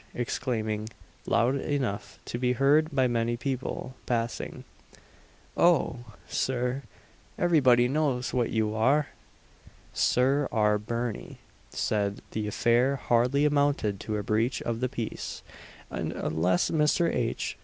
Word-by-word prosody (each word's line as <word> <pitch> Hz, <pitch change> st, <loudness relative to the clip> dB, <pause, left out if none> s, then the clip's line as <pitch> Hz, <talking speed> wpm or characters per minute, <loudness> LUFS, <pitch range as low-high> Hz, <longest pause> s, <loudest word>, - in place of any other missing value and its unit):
exclaiming, 110 Hz, -3 st, -2 dB, 0.4 s
loud 115 Hz, +3 st, +2 dB
enough 130 Hz, -7 st, -3 dB
to 120 Hz, -, -4 dB
be 125 Hz, 0 st, +2 dB
heard 145 Hz, +5 st, +3 dB
by 135 Hz, -2 st, +2 dB
many 120 Hz, 0 st, 0 dB
people 130 Hz, 0 st, -4 dB
passing, 115 Hz, -1 st, -2 dB, 0.9 s
"Oh! 125 Hz, -, +2 dB
Sir 125 Hz, +1 st, -1 dB, 0.6 s
everybody 130 Hz, -8 st, +4 dB
knows 135 Hz, -3 st, 0 dB
what 120 Hz, -2 st, +1 dB
you 110 Hz, -1 st, 0 dB
are!" 135 Hz, +7 st, +2 dB, 0.8 s
SIR 135 Hz, +3 st, +2 dB
R. 105 Hz, -2 st, +2 dB
BIRNIE 115 Hz, +1 st, -4 dB, 0.3 s
said 100 Hz, -1 st, -1 dB
the 110 Hz, -1 st, -2 dB
affair 120 Hz, +5 st, +2 dB
hardly 125 Hz, +3 st, +2 dB
amounted 140 Hz, -9 st, +1 dB
to 110 Hz, -1 st, -3 dB
a 105 Hz, -, -3 dB
breach 115 Hz, +5 st, 0 dB
of 115 Hz, -1 st, -2 dB
the 130 Hz, +1 st, 0 dB
peace, 115 Hz, -3 st, -5 dB, 0.5 s
and -, -, -3 dB
unless 90 Hz, +4 st, 0 dB
Mr. 160 Hz, +2 st, +2 dB
H. 115 Hz, -1 st, -2 dB
120 Hz, 120 wpm, -28 LUFS, 110-135 Hz, 0.9 s, everybody